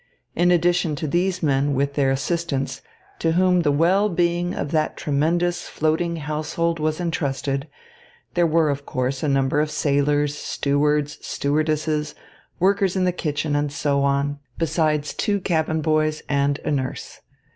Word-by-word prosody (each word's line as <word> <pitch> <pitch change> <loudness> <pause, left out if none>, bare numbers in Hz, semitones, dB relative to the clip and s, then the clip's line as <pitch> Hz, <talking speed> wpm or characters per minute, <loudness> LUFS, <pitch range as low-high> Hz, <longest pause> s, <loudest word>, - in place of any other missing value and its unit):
In 175 +2 +3
addition 175 -2 +2
to 145 - -4
these 180 +4 0
men 140 -1 +2
with 140 +1 0
their 140 -2 +2
assistants, 140 0 -2 0.4
to 165 -1 +1
whom 180 0 +3
the 150 -3 +2
well 180 +8 +3
being 175 0 0
of 145 - -3
that 155 -1 0
tremendous 170 +5 0
floating 160 +2 0
household 155 +2 -2
was 155 +1 -1
entrusted, 140 -4 -2 0.7
there 175 -1 +3
were, 160 -1 +3
of 140 0 -4
course, 130 +1 -2
a 155 - 0
number 135 +1 +2
of 155 - -1
sailors, 145 0 +1
stewards, 150 +1 0
stewardesses, 150 +1 -1 0.4
workers 195 +1 +2
in 190 - +1
the 180 - +2
kitchen, 150 -3 -2
and 145 0 0
so 140 -1 0
on, 140 +1 0 0.2
besides 155 -2 0
two 205 -2 0
cabin 160 -3 0
boys 155 0 +1
and 140 0 +1
a 155 - 0
nurse. 130 -3 -3
155 Hz, 150 wpm, -22 LUFS, 145-170 Hz, 0.7 s, In